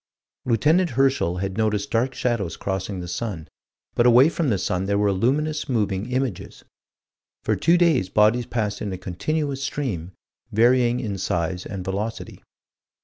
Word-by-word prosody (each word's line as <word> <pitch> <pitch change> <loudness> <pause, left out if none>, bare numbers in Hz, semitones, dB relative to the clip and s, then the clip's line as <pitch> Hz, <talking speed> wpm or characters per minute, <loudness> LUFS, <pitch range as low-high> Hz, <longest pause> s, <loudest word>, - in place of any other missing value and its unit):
Lieut. 115 -2 0
Herschel 135 - +2
had 95 +2 -3
noticed 105 -2 0
dark 125 +2 0
shadows 110 -11 -1
crossing 95 -1 -3
the 90 - -6
sun 90 -4 -4 0.5
but 120 - +3
away 125 +5 +7
from 165 -3 -1
the 105 - +2
sun 90 +1 -1
there 100 +1 +1
were 100 -1 +2
luminous, 145 +11 0
moving 105 -3 -1
images. 130 -6 -3 0.8
For - - +1
two 170 +1 +3
days 160 - +3
bodies 110 +4 +3
passed 105 -4 -2
in 105 - -3
a 95 - -4
continuous 135 - -2
stream, 100 - -3 0.4
varying 120 +2 +3
in 105 -6 -4
size 90 0 -2
and 95 -3 -6
velocity. 105 +4 -4
110 Hz, 150 wpm, -23 LUFS, 95-130 Hz, 0.8 s, away